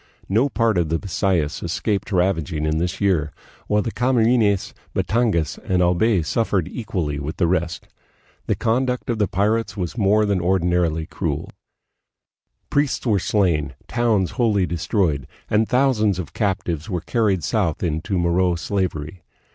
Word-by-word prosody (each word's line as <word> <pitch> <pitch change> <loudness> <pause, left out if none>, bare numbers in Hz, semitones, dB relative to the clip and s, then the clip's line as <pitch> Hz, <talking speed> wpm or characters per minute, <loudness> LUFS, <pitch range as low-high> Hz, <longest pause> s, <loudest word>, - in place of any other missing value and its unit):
No 115 +8 +2
part 115 -7 +1
of 85 -3 0
the 80 - +1
Bisayas 85 -3 -1
escaped 100 +5 -2
ravaging 90 -4 0
in 75 +1 0
this 85 +1 -2
year, 85 -7 +1 0.4
while 105 0 +2
the 115 - -3
Camarines, 115 -5 +2 0.2
Batangas, 110 - 0
and 90 -1 -1
Albay 90 +2 +3
suffered 95 0 0
equally 90 -11 -3
with 75 +3 -5
the 90 - +2
rest. 85 -1 -1 0.6
The - - +1
conduct 125 +2 0
of 115 - -2
the 105 - +2
pirates 110 +4 0
was 90 +1 -3
more 105 +1 +3
than 100 -2 +1
or 90 +2 +2
dinarily 85 -2 0
cruel. - - -3 1.2
Priests 145 -2 +1
were 105 -5 +3
slain, 85 -8 +1
towns 110 -6 +1
wholly 105 -6 +2
destroyed, 85 - -1 0.2
and 105 +1 +2
thousands 125 -7 +2
of 90 -4 -6
captives 95 -4 -2
were 90 -4 -2
carried 100 -3 0
south 85 -2 0
into 85 +4 -1
Moro 90 +1 +2
slavery. 85 -2 -3
95 Hz, 145 wpm, -22 LUFS, 85-110 Hz, 1.2 s, Albay